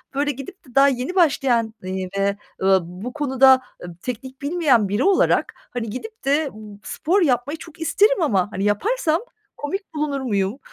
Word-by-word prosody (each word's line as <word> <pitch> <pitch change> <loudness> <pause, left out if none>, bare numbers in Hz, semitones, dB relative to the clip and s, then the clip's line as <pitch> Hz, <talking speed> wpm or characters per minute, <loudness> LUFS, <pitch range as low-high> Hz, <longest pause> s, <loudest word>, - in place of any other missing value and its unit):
böyle, 290 +1 +1
gidip 290 - -10
de 250 - -18
daha 275 0 +7
yeni 265 +6 -1
başlayan, 260 - +2
iii, 185 0 -4
ve, 200 0 +1 0.2
eee, 190 0 +5
bu 180 +8 -8
konuda, 265 -3 +5 0.2
eee, - - -6
teknik 260 +2 -6
bilmeyen 285 - +2
biri 205 +6 0
olarak, 390 +1 +3 0.2
hani, 230 -2 -3
gidip 430 - -8
de 285 +2 +2
b 210 -1 -11
spor 360 +6 0
yapmayı 275 0 +1
çok 330 +1 -13
isterim 405 +7 +3
ama, 205 - +1
hani, 195 - -3
yaparsam 320 - +1 0.4
komik 380 +7 -5
bulunur 295 -3 -2
muyum? 205 -1 -1
265 Hz, 170 wpm, -22 LUFS, 215-315 Hz, 0.4 s, daha